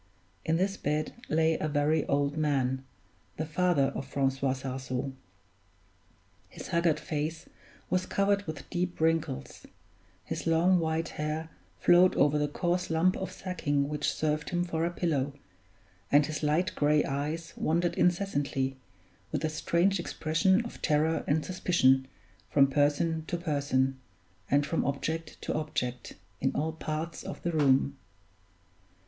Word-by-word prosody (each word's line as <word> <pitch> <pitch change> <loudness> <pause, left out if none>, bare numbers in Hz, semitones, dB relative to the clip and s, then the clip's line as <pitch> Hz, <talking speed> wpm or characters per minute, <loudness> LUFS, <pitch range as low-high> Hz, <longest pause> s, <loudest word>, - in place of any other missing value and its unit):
In 160 - +1
this 195 +2 0
bed 150 +1 -1 0.2
lay 160 +1 +2
a 155 - -1
very 150 +1 +1
old 140 0 +1
man, 135 -4 0 0.5
the 155 - -2
father 155 -3 +2
of 135 - -5
Francois 135 -1 0
Sarzeau. 130 0 -4 1.4
His - - -9
haggard 170 -2 +2
face 155 +1 -3 0.4
was 185 0 0
covered 200 0 +1
with 155 - -6
deep 180 0 -2
wrinkles; 160 -3 -1 0.6
his - - -4
long 175 +3 +4
white 160 0 -1
hair 155 +2 -3 0.3
flowed 180 +1 +5
over 150 +1 +3
the 150 - +1
coarse 175 +4 -1
lump 165 +3 +3
of 190 - -4
sacking 145 -6 -1
which 150 0 0
served 150 -1 -1
him 175 0 0
for 165 -2 -1
a - - +1
pillow, 150 -6 -1 0.8
and 145 +1 +6
his 155 0 -4
light 155 +4 +1
gray 150 0 +3
eyes 150 +4 -3
wandered 170 +2 +1
incessantly, 145 -7 0 0.5
with - - -1
a - - +1
strange 170 +5 +1
expression 185 +6 +1
of 235 - -9
terror 155 +2 +2
and 150 +2 +1
suspicion, 135 -8 +3 0.4
from 140 -1 +5
person 145 +3 +1
to 175 - -1
person, 140 -5 0 0.5
and 145 +1 +3
from 160 +3 0
object 155 +3 -3
to - - -2
object, 125 -5 -3 0.2
in 135 - +1
all 155 +3 0
parts 160 +1 -4
of - - -8
the 175 - 0
room. 135 - +2
155 Hz, 140 wpm, -29 LUFS, 145-170 Hz, 1.4 s, and